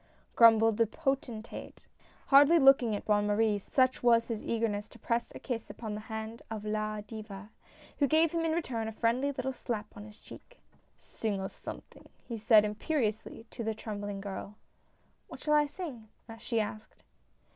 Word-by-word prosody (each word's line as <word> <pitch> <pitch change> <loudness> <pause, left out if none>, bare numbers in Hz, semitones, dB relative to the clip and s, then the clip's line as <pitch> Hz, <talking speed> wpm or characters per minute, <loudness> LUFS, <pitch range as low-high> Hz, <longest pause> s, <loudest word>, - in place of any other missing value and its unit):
" - - -36
grum 230 -1 +8
bled 225 -1 +2
the 230 -1 +3
potentate, 255 -5 -4 0.4
hardly 285 +4 +7
looking 270 -6 +5
at - - -6
Bonne 205 -1 +2
Marie, 210 0 +2
such 255 +5 +1
was 230 -1 +4
his 225 -2 -3
eagerness 220 -2 -2
to - - -15
press 235 0 -2
a - - -7
kiss 230 -3 -5
upon 220 -3 -6
the 210 - -4
hand 220 +1 -6
of 215 -2 -6
La 215 0 -2
Diva, 210 -1 -9 0.5
who 285 - +4
gave 320 +2 +3
him 335 - -1
in 325 - +1
return 255 -9 -2
a - - -3
friendly 240 +5 0
little 265 -1 -3
slap 230 -4 -5
on 205 - -9
his 210 -1 -14
cheek. - - -14 0.4
"Sing 210 -3 -4
us 190 - -5
something!" - - -10 0.2
he 235 - -4
said 215 -1 +5
imperiously, 220 0 -2
to 235 - -6
the 220 0 -2
trembling 205 -2 -5
girl. 200 +1 -7 0.4
" - - -40
What - - -10
shall 300 - +1
I 295 -1 +4
sing? 285 -9 -8 0.2
" 225 -1 -11
she 230 0 -1
asked. 215 0 -6
225 Hz, 185 wpm, -30 LUFS, 210-255 Hz, 0.5 s, grum